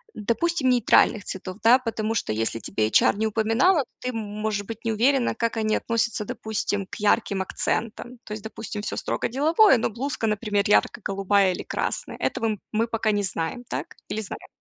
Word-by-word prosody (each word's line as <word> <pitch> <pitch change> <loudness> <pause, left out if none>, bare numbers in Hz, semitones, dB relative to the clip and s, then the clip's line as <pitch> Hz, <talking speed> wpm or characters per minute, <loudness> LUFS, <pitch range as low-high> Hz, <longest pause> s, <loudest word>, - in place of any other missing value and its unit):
допустим, 260 - 0
нейтральных 235 -3 +4
цветов. 185 -1 -6
Да, 235 +3 +7
потому 225 -2 -2
что 110 - -1
если 115 +1 -1
тебе 110 0 -1
эйчар 110 - +4
не 220 - +1
упоминала, 225 - +3
то - - -27
ты 250 - -2
м 250 - -5
можешь 210 -1 -3
быть 225 +1 -8
не 225 - 0
уверена, 245 +2 +2
как 230 0 -1
они 215 -1 +1
относятся, 230 -2 -1
допустим, 220 -4 -3
к - - -9
ярким 205 -2 +1
акцентам. 235 +5 -3
То 210 - -7
есть, 215 0 -7
допустим, 220 -1 -6
всё - - -4
строго - - -1
деловое, 305 - +4
но 225 - 0
блузка, 255 +1 -3
например, 210 -1 0
ярко-голубая 195 -2 +2
или - - -5
красная. - - -3
Этого 220 -2 -1
мы 225 +2 +1
пока 225 -1 0
не 205 -1 0
знаем, 175 +6 -3
так? - - -5
Или 220 - -2
знаем? 205 - -8
220 Hz, 185 wpm, -25 LUFS, 205-235 Hz, -, Да